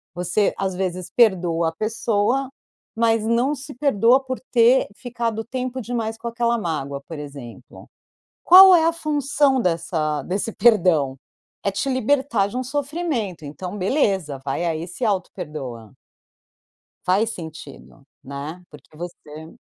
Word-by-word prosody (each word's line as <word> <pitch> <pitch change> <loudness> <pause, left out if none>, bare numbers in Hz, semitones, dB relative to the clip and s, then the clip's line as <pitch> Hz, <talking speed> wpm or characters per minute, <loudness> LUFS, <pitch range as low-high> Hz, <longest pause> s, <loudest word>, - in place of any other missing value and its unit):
Você, 180 +4 +1
às 190 -1 -1
vezes, 185 -1 -3
perdoa 175 -7 +3
a - - -7
pessoa, 225 +5 0 0.5
mas 225 -1 +2
não 235 +5 +2
se 285 0 -8
perdoa 250 -1 +3
por 260 -1 -4
ter 240 +2 +5
ficado 230 -2 -3
tempo 255 +1 -4
demais 225 -1 -3
com 230 +1 -7
aquela 235 0 0
mágoa, 140 -8 -3
por 160 -3 -7
exemplo. 135 -4 -11 0.5
Qual 375 +1 +10
é 325 -2 +4
a 330 - +4
função 290 -4 +1
dessa 165 -4 -1
desse 200 +5 -2
perdão? 180 - +3 0.5
É 200 - 0
te 200 +8 -3
libertar 260 -4 +1
de 205 - -6
um 255 - -1
sofrimento, 275 - -3
então, 180 +7 -7
beleza, 190 - 0
vai 145 +5 -2
aí 165 -1 -2
e 175 - -7
se 210 +8 -4
autoperdoa. 150 - -4 1.1
Faz 200 +5 +2
sentido, 155 -6 -10 0.2
né? 145 +6 -7
Porque 150 +1 -16
você 160 -2 -10
205 Hz, 135 wpm, -22 LUFS, 165-250 Hz, 1.1 s, Qual